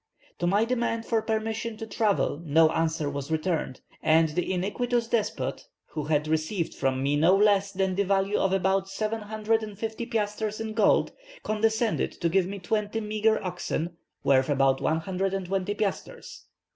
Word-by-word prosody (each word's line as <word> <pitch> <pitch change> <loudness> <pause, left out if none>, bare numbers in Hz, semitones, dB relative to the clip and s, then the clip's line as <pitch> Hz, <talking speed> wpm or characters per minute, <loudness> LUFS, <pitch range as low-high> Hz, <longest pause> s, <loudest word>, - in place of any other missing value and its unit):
To 175 - 0
my 205 +5 +3
demand 235 -2 -1
for 225 -2 +1
permission 220 0 -2
to 225 - -6
travel 210 -8 0
no 160 0 +4
answer 160 -2 0
was 140 0 -4
returned, 160 -4 -1 0.2
and 160 0 +4
the 175 +4 -2
iniquitous 230 +6 -1
despot, 230 -3 -2 0.2
who 150 -2 -4
had 150 0 +1
received 160 +3 -1
from 135 -1 -1
me 140 +1 +2
no 165 +6 +5
less 200 -1 +3
than 190 -1 0
the 195 - +1
value 195 +1 +1
of 195 - +1
about 190 0 +1
750 220 +1 -2
piastres 215 -2 -2
in 220 -1 -4
goods, 215 -2 +3 0.3
condescended 220 +1 0
to 170 - -1
give 185 +1 +2
me 200 +1 -5
twenty 210 +3 -1
meagre 215 0 +1
oxen, 175 -2 -3 0.3
worth 135 0 +3
about 135 -1 +2
120 190 +3 -1
piastres. 215 - -4
195 Hz, 150 wpm, -27 LUFS, 165-220 Hz, 0.3 s, no